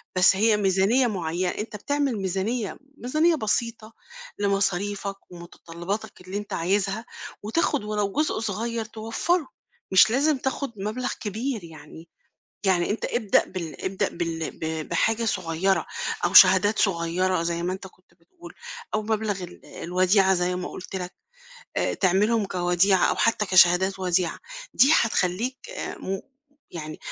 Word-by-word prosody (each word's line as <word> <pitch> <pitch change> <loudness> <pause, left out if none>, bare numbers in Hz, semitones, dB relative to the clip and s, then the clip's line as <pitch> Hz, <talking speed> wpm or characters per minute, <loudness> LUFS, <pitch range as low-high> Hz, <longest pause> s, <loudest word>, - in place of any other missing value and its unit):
بس 185 +1 +6
هي 215 +2 +3
ميزانية 200 +6 +3
معيّنة، 180 -3 -2
أنت 210 +3 -5
بتعمل 280 +1 -1
ميزانية، 195 +4 -2 0.2
ميزانية 310 +7 +2
بسيطة 230 -2 -2 0.5
لمصاريفك 200 0 -1
ومتطلّباتك 175 +4 -7
اللي 185 +2 -6
أنت 205 - -6
عايزها، 195 +5 0 0.4
وتاخد 280 +3 0
ولو 210 -1 -1
جزء 305 -3 0
صغيّر 225 +2 -3
توفّره، 225 +10 -1 0.4
مش 190 +2 +7
لازم 285 +3 +2
تاخد 265 0 -3
مبلَغ 215 +6 -3
كبير 220 +1 -3
يعني. 160 0 -13 0.6
يعني 180 -1 +2
أنت 215 - -2
ابدأ 220 -5 +2
بال 170 -4 -7
ابدأ 190 0 0
بال 165 -1 -3
ب 160 -1 -3
بحاجة 225 +1 +1
صغيّرة 175 -3 0 0.4
أو 175 - +1
شهادات 190 +3 +7
صغيّرة 180 -1 +1
زي 170 0 -2
ما 180 +1 -1
أنت 190 +1 -7
كنت 185 0 -21
بتقول، 345 - -15 0.4
أو 215 - +1
مبلَغ 215 -3 -2
ال 175 - -10
الوديعة 185 +2 +2
زي 180 0 0
ما 180 - -4
قُلت 190 - -8
لك، 180 -1 -5 0.6
آآ، - - 0
تعملهم 205 +4 +2
كوديعة 180 +1 +2
أو - - +1
حتى 225 -2 +2
كشهادات 185 +1 +5
وديعة، 180 -2 0 0.4
دي 275 +5 +6
هتخلّيك، 225 +4 0
آآ، - - -6
م 190 0 -4 0.5
يعني 155 -2 -7
195 Hz, 135 wpm, -25 LUFS, 180-220 Hz, 0.6 s, مش